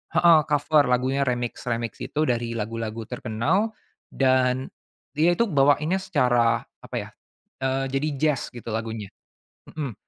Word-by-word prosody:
heeh 170 -2 +7
cover 150 0 +3
lagunya 130 +2 +1
remix-remix 120 -2 -2
gitu 155 - -1
dari 120 -4 -1
lagu-lagu 115 0 -4
terkenal, 125 - -1 0.3
dan 130 -1 +1 0.4
dia 165 +4 +3
itu 235 - +3
bawainnya 145 +5 +3
secara 120 -8 +2 0.2
apa - - -9
ya, - - -3 0.5
eee, 130 0 0
jadi 135 +3 0
jazz 150 -1 0
gitu 120 -1 -7
lagunya. 110 -2 -4 0.6
Mhm, 145 -6 -5
130 Hz, 125 wpm, -25 LUFS, 115-150 Hz, 0.6 s, heeh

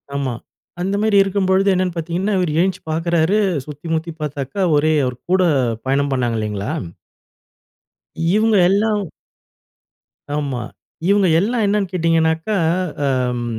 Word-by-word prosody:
ஆமா. 135 -3 -1 0.5
அந்த 195 +2 -1
மாரி 215 -1 +3
இருக்கும்பொழுது 195 0 +1
என்னென்னு 185 -1 -1
பார்த்தீங்கன்னா, 175 +5 -1
இவரு 175 -4 0
எந்திச்சு 185 0 0
பாக்குறாரு, 170 +4 +1 0.3
சுத்தி 150 +2 -9
முத்தி 160 +1 -2
பாத்தாக்கா 145 +4 -3
ஒரே 155 +2 +2
அவரு 125 -1 -3
கூட 185 - +4 0.5
பயணம் 140 +1 +1
பண்ணாங்க 120 -3 0
இல்லைங்களா? 105 -1 -3 1.6
இவங்க 220 0 +3
எல்லாம் 210 +2 +1 1.3
ஆமா. 140 -4 -2 0.5
இவங்க 200 -1 +4
எல்லாம் 225 +4 0
என்னென்னு 200 -2 0
கேட்டீங்கனாக்கா, 165 +2 +1 0.5
அம் 125 -3 0
165 Hz, 115 wpm, -19 LUFS, 140-195 Hz, 1.6 s, கூட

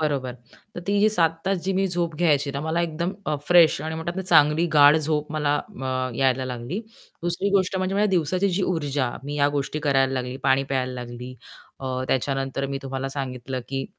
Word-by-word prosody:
बरोबर, 140 -5 -1 0.4
तर 175 - -5
ती 200 0 +1
जी 215 - +5
7 170 -7 +3 0.2
तास 190 -1 -1
मी 195 +1 +2
झोप 175 -2 -1
घ्यायची 150 -4 +2
ना, 140 - -4
तर 145 - -4
मला 165 +2 0
एकदम 170 +2 -2 0.3
फ्रेश 175 -3 +6
आणि 160 0 -4
म्हणतात 160 +2 -4
ना, 190 - -2
चांगली 155 -2 +4
गाढ 145 0 +7
झोप 150 -1 -1
मला 150 -2 +1 0.3
अ, 130 -1 -1
यायला 130 0 +1
लागली. 125 - -4 0.4
दुसरी 175 +3 0
गोष्ट 190 -1 +2
म्हणजे 185 +1 -1
माझ्या 210 +1 +3
दिवसाची 185 +2 +1
जी 185 +2 0
ऊर्जा, 145 -8 -1
मी 145 +1 -4
या 145 0 +4
गोष्टी 145 +2 -2
करायला 135 -3 +2
लागली, 125 -1 -3
पाणी 135 0 +3
प्यायला 130 -2 -2
लागली. 125 0 -7 0.5
अ, 130 -1 -3
त्याच्यानंतर 135 +1 -1
मी 135 0 -3
तुम्हाला 135 0 -4
सांगितलं 130 -2 -4
की 135 0 -3
145 Hz, 195 wpm, -24 LUFS, 135-170 Hz, 0.5 s, गाढ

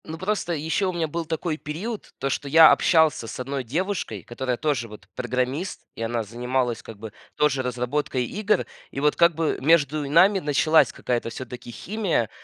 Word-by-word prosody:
Ну, 160 +1 -6
просто 185 -1 -1
и 150 - -3
ещё 160 +5 0
у - - -3
меня 165 -2 -1
был 165 +2 -4
такой 160 0 -2
период, 185 +10 -6
то, 135 - -2
что 140 - -3
я 160 +2 +9
общался 160 -8 +3
с - - -7
одной 135 +1 -3
девушкой, 155 - -3
которая 125 +3 -3
тоже 140 -6 -1
вот 105 -2 -13
программист, 130 +7 -2
и - - -8
она 115 0 -1
занималась, 120 +2 -2
как 115 - -11
бы, 105 0 -9 0.2
тоже 150 -3 +2
разработкой 125 +1 -1
игр. 210 - 0 0.2
И - - -6
вот, 150 +1 +2
как 170 -1 +4
бы, 160 0 0
между 150 0 +3
и - - -5
нами 190 +6 +5
началась 155 0 +3
какая-то 120 -2 -2
всё-таки 125 0 -8
химия. 170 - -1
145 Hz, 190 wpm, -24 LUFS, 125-165 Hz, 0.2 s, я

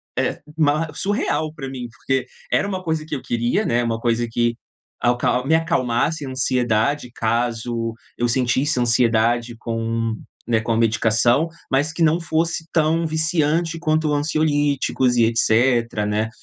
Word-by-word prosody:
é - - -1 0.2
ma 155 +1 +2
surreal 160 -4 -1
pra 135 -3 -6
mim, 130 -2 -6
porque 130 +1 -2 0.2
era - - +2
uma 185 -2 -4
coisa 160 -2 -1
que 150 - -3
eu 135 - -6
queria, 120 - 0
né, 120 +1 +1
uma 115 -1 -1
coisa 120 0 0
que 120 +1 +1 0.5
alcal 125 +1 +1
me 160 - +3
acalmasse 155 -2 0
a - - -6
ansiedade 125 0 0
caso 115 0 -1 0.2
eu 120 - +1
sentisse 130 +3 +1
ansiedade 120 0 +2
com, 115 -1 -2 0.3
né, 115 -2 +2
com 115 +1 -3
a - - +2
medicação, 115 +6 +2 0.2
mas 145 +4 +1
que 170 - -5
não 160 +1 +3
fosse 165 0 -1
tão 165 +1 +2
viciante 160 +1 0
quanto 155 -2 +1
ansiolíticos 145 -4 +1
e 115 - +5
etcétera, 115 -1 +2
né, 105 +1 0
125 Hz, 150 wpm, -21 LUFS, 115-155 Hz, 0.5 s, e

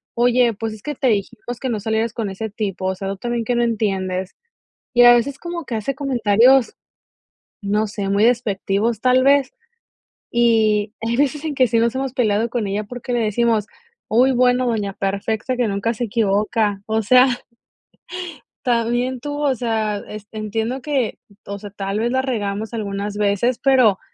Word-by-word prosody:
"Oye, 240 0 +3
pues 225 +2 -4
es 210 - -16
que 295 +1 -3
te 265 - -1
dijimos 230 +2 -2
que 260 - -3
no 225 -3 -1
salieras 220 +2 -1
con 225 -4 -3
ese 210 +3 -5
tipo, 195 -3 -4
o 190 - +1
sea, 195 +1 -6
tú 195 - -4
también 240 +2 -2
que 245 +2 -1
no 240 - +2
entiendes". 190 -5 -1 0.6
Y 245 - +6
a 240 0 +9
veces 265 +4 +1
como 345 -1 -6
que 235 - -4
hace 220 +5 -2
comentarios, 250 -2 +3 0.9
no 210 +1 0
sé, 205 -2 -4
muy 200 +2 +2
despectivos 225 -1 +1
tal 255 0 +4
vez. 275 -1 +4 0.8
Y 220 -3 +2
hay 230 +1 -1
veces 290 +2 +1
en 305 -2 -3
que 260 -1 +4
sí 230 0 +1
nos 235 +2 +1
hemos 265 -1 -2
peleado 225 -2 +1
con 235 -4 -1
ella 200 +2 -2
porque 245 +3 -7
le 240 - +1
decimos: 220 0 +1 0.4
"Uy, 255 +4 +3
bueno 250 0 +3
doña 210 -4 -1
perfecta, 210 +6 -2
que 245 -2 +1
nunca 205 +3 -1
se 240 - -3
equivoca. 210 -1 0
O 220 0 0
sea, 250 +4 +6 1.4
también 240 +1 0
tú". 290 +3 -5
O 290 -2 +2
sea, 220 -3 -1
este, 215 +1 -9
entiendo 225 +4 -3
que, 270 -5 -1 0.3
o 200 0 -6
sea, 205 - -8
tal 200 +1 -3
vez 235 +1 0
la 260 +1 +1
regamos 215 -4 -3
algunas 205 -2 -4
veces, 210 +4 +1
pero 255 -8 +4
225 Hz, 180 wpm, -20 LUFS, 205-245 Hz, 1.4 s, a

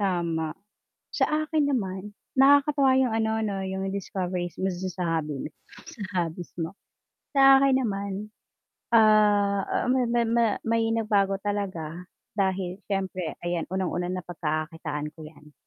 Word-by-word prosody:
Tama. 170 -5 -1 0.6
Sa - - +3 0.2
akin 305 -2 +1
naman, 195 -6 -2 0.2
nakakatuwa 275 0 +5
'yung 255 -4 +2
ano 220 0 +1
'no 195 -2 -2
'yung 190 0 -3
discoveries 180 -2 -3
mo 190 - -1
dun 185 0 -2
sa 180 -1 -4 0.2
hobby 150 -2 -5
mo - - -5 0.4
sa 220 - -9 0.2
hobbies 165 +2 -8
mo. 165 +3 -3 0.6
Sa 270 0 +8
akin 270 -1 +4
naman, 200 0 -3 0.6
ah, 210 -2 +4
ma 255 0 +3
ma 235 0 +1
ma 235 0 +3 0.2
may 225 0 +2
nagbago 200 -3 +1
talaga 185 -5 -3 0.3
dahil 190 -2 0
siyempre 190 -4 -3
ayan 175 -2 -2
unang-una 180 -1 -1
na 185 - -2
pagkakakitaan 155 -3 -3
ko 160 - -10
'yan. 150 -1 -15
195 Hz, 140 wpm, -26 LUFS, 175-225 Hz, 0.6 s, Sa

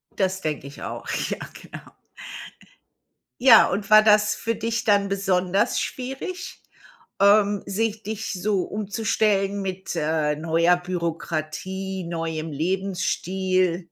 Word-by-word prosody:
Das 190 -1 0
denke 150 -3 -3
ich 140 - -12
auch. - - -6 0.2
Ja, - - -2 0.2
genau. - - -12 1.5
Ja, 245 -4 +8
und 195 +2 -3
war 215 0 +9
das 210 -1 +4
für 230 0 -2
dich 230 0 -2
dann 200 -2 +3
besonders 190 -1 +1
schwierig, 270 +9 -5 0.6
ähm, 205 0 +4
sich 215 +2 -1
dich 220 +1 -4
so 190 0 0
umzustellen 205 -1 0
mit, 190 -1 -5
äh, 155 -1 0
neuer 165 +3 +2
Bürokratie, 180 +2 -4
neuem 165 -2 -4
Lebensstil? 185 +1 -1
190 Hz, 110 wpm, -24 LUFS, 175-210 Hz, 1.5 s, war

